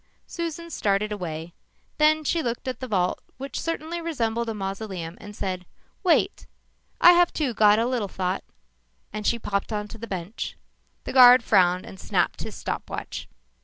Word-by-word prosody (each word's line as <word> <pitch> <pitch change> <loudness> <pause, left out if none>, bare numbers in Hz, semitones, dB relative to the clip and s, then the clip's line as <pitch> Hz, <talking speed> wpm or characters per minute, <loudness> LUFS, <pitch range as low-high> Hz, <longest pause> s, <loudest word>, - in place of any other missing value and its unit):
Susan 335 0 -5
started 205 -4 0
away. 170 -4 -5 0.5
Then 310 +1 +4
she 330 +3 +1
looked 240 -1 -3
at 255 - -3
the 255 - -5
vault 185 -5 +1 0.2
which 275 +2 -5
certainly 330 +1 -3
resembled 235 -8 -1
a - - -2
mausoleum 195 -4 -5
and 210 -1 -10
said, 185 -2 -3 0.4
"Wait 365 +2 +2 0.5
I 350 - +9
have 350 0 +5
too 280 -6 -1
got 210 -1 +5
a 230 - +2
little 240 -4 -1
thought," 185 0 -2 0.7
and 210 0 -3
she 235 - +3
popped 200 -3 -2
onto 210 +1 -4
the 230 - -6
bench. 185 +2 -5 0.5
The - - -5
guard 250 -2 +9
frowned 180 -4 +3
and 190 - -11
snapped - - 0
his - - -6
stop - - -4
watch. - - -6
220 Hz, 165 wpm, -25 LUFS, 195-280 Hz, 0.7 s, I